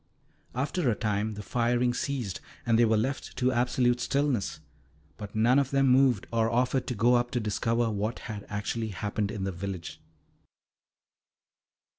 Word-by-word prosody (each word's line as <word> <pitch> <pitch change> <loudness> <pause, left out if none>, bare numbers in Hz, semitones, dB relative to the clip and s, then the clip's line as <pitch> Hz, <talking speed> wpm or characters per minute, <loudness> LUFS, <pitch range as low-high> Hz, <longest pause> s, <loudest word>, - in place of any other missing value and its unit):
After 140 +3 0
a 110 - +2
time 105 0 -1
the 105 - -7
firing 120 +2 +1
ceased, 125 -7 -3 0.2
and 115 -1 +3
they 120 - +6
were 110 -1 +3
left 130 +6 -3
to 130 0 +2
absolute 125 0 +2
stillness. 135 -4 0 0.6
But 105 -1 -9
none 120 +5 +4
of 135 -2 0
them 135 -1 +3
moved, 125 -5 +4
or 115 -1 +2
offered 125 +2 +1
to 125 - -2
go 115 +4 +4
up 120 0 +2
to 125 - -1
discover 115 +2 0
what 105 +2 -2
had 105 -3 -6
actually 105 +2 -2
happened 105 +1 -2
in 105 -3 -4
the 95 - -1
village. 90 -2 -6
115 Hz, 160 wpm, -28 LUFS, 105-125 Hz, 0.6 s, they